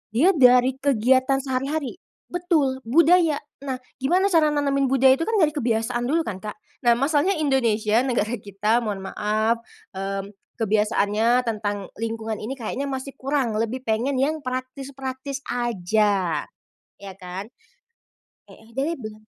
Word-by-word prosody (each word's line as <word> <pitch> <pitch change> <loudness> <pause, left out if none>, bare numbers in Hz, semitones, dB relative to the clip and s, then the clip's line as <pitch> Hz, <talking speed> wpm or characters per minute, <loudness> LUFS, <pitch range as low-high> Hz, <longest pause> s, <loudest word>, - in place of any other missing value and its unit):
dia 325 +11 +5
dari 250 -5 +5
kegiatan 265 +1 +2
sehari-hari 275 +4 -2 0.3
betul, 320 -7 +1
budaya 330 +3 +5 0.2
nah, 270 -2 -4 0.2
gimana 365 +9 +2
cara 325 -3 +5
nanemin 280 -2 +1
budaya 265 +1 +4
itu 330 - -2
kan 450 - 0
dari 320 -7 +4
kebiasaan 240 -3 -1
dulu 325 +5 +1
kan 190 -4 -5
Kak. 210 -1 -6 0.3
Nah, 235 - +6
masalahnya 295 +8 +2
Indonesia, 230 -7 +2
negara 235 -3 0
kita, 210 +3 0
mohon 205 -5 -4
maaf, 215 +3 0 0.3
mmm, 195 +1 -4 0.2
kebiasaannya 215 +2 +2
tentang 205 -4 -3
lingkungan 225 -1 -3
ini 250 +6 -5
kayaknya 265 +3 -4
masih 270 0 -5
kurang, 260 -5 0
lebih 235 +3 -2
pengen 235 +4 0
yang 300 +4 +1
praktis-praktis 265 +1 -5
aja, 205 -7 0 0.5
ya 195 -1 -8
kan 190 +3 -7 1.0
heeh 225 +1 -17
dari 275 +7 -1
be 215 -3 -9
250 Hz, 135 wpm, -23 LUFS, 215-275 Hz, 1.0 s, Nah